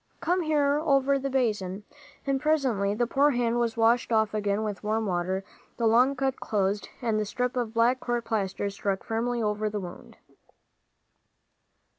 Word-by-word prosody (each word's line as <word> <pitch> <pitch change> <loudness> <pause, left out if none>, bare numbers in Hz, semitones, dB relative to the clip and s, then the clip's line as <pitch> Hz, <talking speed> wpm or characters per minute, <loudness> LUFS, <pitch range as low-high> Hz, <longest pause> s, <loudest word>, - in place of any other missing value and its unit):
"Come 360 +2 +1
here, 295 -3 +2
over 275 -2 +3
the 275 +1 -3
basin." 210 -7 -1 0.4
And 275 -1 0
presently 255 -10 +1
the 240 +2 +1
poor 275 +4 +3
hand 240 -3 +1
was 235 -1 -1
washed 230 +2 +3
off 220 -1 +2
again 205 0 0
with 210 -2 -4
warm 220 +1 0
water, 185 0 -1 0.3
the 235 - 0
long 245 +5 +4
cut 270 0 -1
closed, 200 -1 -1
and 220 -2 +1
the - - +1
strip 250 +4 -2
of 235 -2 -2
black 240 +3 +3
court 240 -1 -2
plaster 200 -3 -1
stuck 195 -1 -2
firmly 235 +1 -1
over 210 0 0
the 210 0 -3
wound. 180 -2 -10
230 Hz, 165 wpm, -27 LUFS, 210-260 Hz, 0.4 s, long